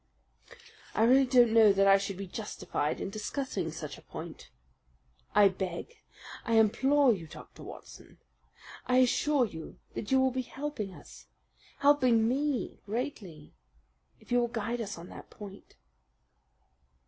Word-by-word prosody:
"I 220 - +3
really 260 +3 +5
don't 245 -3 +5
know 220 -2 +7
that 195 0 +3
I 195 0 +6
should 195 -1 -4
be 195 - -5
justified 190 -6 -3
in 195 - -4
discussing 255 +6 -3
such - - -7
a - - -17
point." - - -9 0.9
"I 205 - +7
beg 190 - -5 0.4
I 230 - 0
implore 265 +5 +4
that 205 - -1
you 165 - -9
will, - - -22
Dr. - - -12
Watson! - - -12 0.7
I 250 - +3
assure 255 +2 +3
you 160 -7 -9 0.2
that 205 - -5
you 265 - +5
will 260 0 +3
be 260 +1 -2
helping 265 -6 -5
us - - -14 0.5
helping 255 -6 +4
me 275 +1 -1
greatly 210 - -5 0.7
if - - -19
you 245 - +4
will 240 - +1
guide 235 0 -3
us 205 -4 -5
on 170 +1 -10
that - - -11
point." 200 -2 -12
230 Hz, 150 wpm, -30 LUFS, 200-260 Hz, 0.9 s, know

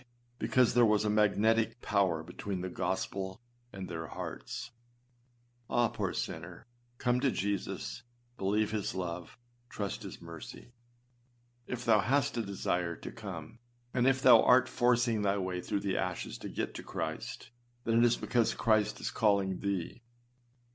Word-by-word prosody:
because 125 -2 +3
there 120 0 +5
was 105 -1 +4
a 105 - +2
magnetic 110 +2 +3
power 95 -8 +1
between 95 +3 -5
the 95 - -3
gospel 95 +2 -2 0.3
and 95 -2 -6
their 80 -2 -5
hearts. - - -6 1.0
AH! 120 -1 +3
poor - - -2
sinner, 85 +4 -5 0.3
come 125 +1 +2
to 135 +1 +3
Jesus, 100 +2 -2 0.3
believe 105 0 +1
his 105 -3 -2
love, 90 0 -5 0.3
trust 100 -2 -4
his - - -8
mercy. 85 +8 -10 0.9
If 125 -1 -4
thou 110 -3 +5
hast 130 +7 +2
a 115 - 0
desire 90 -4 -1
to - - -8
come, 100 -3 -8 0.3
if 130 +1 +3
thou 120 -3 +9
art 125 +1 +6
forcing 120 -2 +2
thy 100 0 +2
way 95 -2 -2
through 100 - -2
the 100 -2 -1
ashes - - -3
to - - -6
get - - -3
to - - -7
Christ, - - -5 0.3
then 115 0 +3
it - - +6
is 120 -1 +4
because 120 -3 +1
Christ 110 -2 +2
is - - -2
calling 100 -3 +2
thee. 100 +3 -3
105 Hz, 150 wpm, -32 LUFS, 95-115 Hz, 1.0 s, thou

